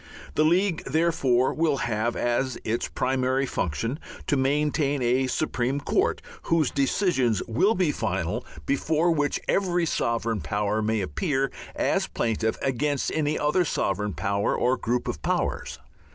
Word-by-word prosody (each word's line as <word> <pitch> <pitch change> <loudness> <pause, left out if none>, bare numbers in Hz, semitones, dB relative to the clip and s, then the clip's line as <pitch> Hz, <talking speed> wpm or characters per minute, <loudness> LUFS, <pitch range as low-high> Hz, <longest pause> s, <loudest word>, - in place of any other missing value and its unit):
The 155 - +3
League, 175 +2 +2
therefore, 140 -6 +2
will 155 -3 +1
have 115 -1 -1
as 120 +1 0
its 115 +2 -1
primary 130 +1 0
function 115 - -2 0.3
to - - +1
maintain 145 +1 +1
a 125 +2 +2
Supreme 130 -1 -1
Court, - - 0 0.2
whose 165 -3 +1
decisions 135 - +1
will 160 - +2
be 180 -5 +2
final, - - -2 0.2
before 160 +4 +1
which 145 -3 0
every 180 -3 +1
sovereign 115 - -1
power 105 +7 -1
may 110 0 0
appear 135 - -1 0.2
as - - +1
plaintiff 110 -1 -1
against 135 +2 0
any 155 -1 0
other 150 +5 +2
sovereign 105 - -1
power 100 +2 0
or 125 +1 +2
group 120 0 -1
of 75 - -3
powers. - - -1
135 Hz, 135 wpm, -26 LUFS, 115-155 Hz, 0.3 s, The